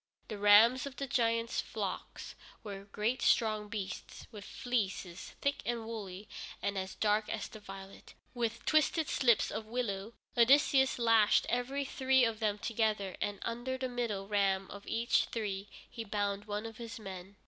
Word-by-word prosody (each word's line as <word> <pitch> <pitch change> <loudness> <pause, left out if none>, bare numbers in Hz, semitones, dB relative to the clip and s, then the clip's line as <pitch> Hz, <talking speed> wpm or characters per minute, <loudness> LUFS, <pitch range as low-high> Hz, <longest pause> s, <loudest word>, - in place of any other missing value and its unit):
The 215 -2 -5
rams 220 +6 +6
of 275 - -8
the 275 - -3
giant's 230 -2 +1
flocks - - -5 0.3
were 200 -2 -7
great 210 +5 -1
strong 215 -2 +2
beasts, 205 -3 -6
with 210 -3 -9
fleeces 195 -7 -3
thick 280 0 0
and 235 -2 -2
woolly, 205 -3 -6 0.3
and 200 - -2
as 190 0 -4
dark 210 0 +1
as 220 - -3
the 215 - -11
violet. 195 -1 -11 0.2
With 230 -2 -2
twisted 310 0 +3
slips 235 -5 +3
of 220 0 -5
willow 220 -3 -3 0.2
Odysseus 265 +2 +5
lashed 230 -3 +4
every 265 +4 -1
three 265 -1 +3
of 225 -1 -2
them 210 -2 0
together, 215 -4 -1
and 205 0 -1
under 240 +3 -3
the 260 0 -2
middle 230 -6 -2
ram 195 -2 +1
of 200 0 -10
each 230 +1 +2
three 205 -3 -4 0.2
he 230 - -6
bound 205 -1 -2
one 210 +1 -3
of 225 -1 -8
his 230 -1 -7
men. 190 -1 -8
220 Hz, 160 wpm, -33 LUFS, 200-240 Hz, 0.3 s, rams